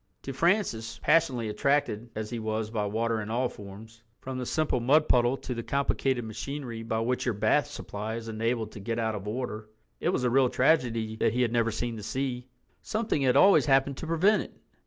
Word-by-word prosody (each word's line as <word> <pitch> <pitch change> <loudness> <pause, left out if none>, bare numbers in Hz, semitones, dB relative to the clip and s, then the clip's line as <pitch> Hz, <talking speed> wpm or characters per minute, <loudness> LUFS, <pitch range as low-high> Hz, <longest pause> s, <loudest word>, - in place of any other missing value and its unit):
To 135 - -5
Francis, 150 - 0
passionately 125 -8 +2
attracted 120 -1 0
as 110 +1 -4
he 120 - -3
was 110 0 -2
by 105 -2 -1
water 115 +1 -1
in 105 - -6
all 120 +2 0
forms, 105 +3 -12 0.2
from 130 -1 -5
the 125 - -4
simple 155 -5 0
mud 145 +6 +3
puddle 120 +2 +3
to 130 - -5
the 115 - -4
complicated 135 -1 0
machinery 120 +1 -5
by 110 0 -2
which 125 +2 0
your 120 -4 -1
bath 110 +8 +2
supply 110 -6 -5
is 115 -1 -6
enabled 115 0 -2
to - - -9
get 115 +3 -3
out 110 -1 0
of 105 -1 -6
order, 110 -2 -4 0.3
it - - 0
was 175 - 0
a 125 - +3
real 130 0 +4
tragedy 115 -6 +1
that 110 - +1
he 125 +1 +2
had 115 - 0
never 115 -1 +2
seen 115 +1 -3
the - - -7
sea. 125 +3 -3 0.3
Something 220 -8 -1
had 130 -1 +3
always 195 0 +6
happened 135 0 +3
to 165 - -6
prevent 185 +6 +3
it. - - -11
120 Hz, 210 wpm, -28 LUFS, 110-135 Hz, 0.3 s, always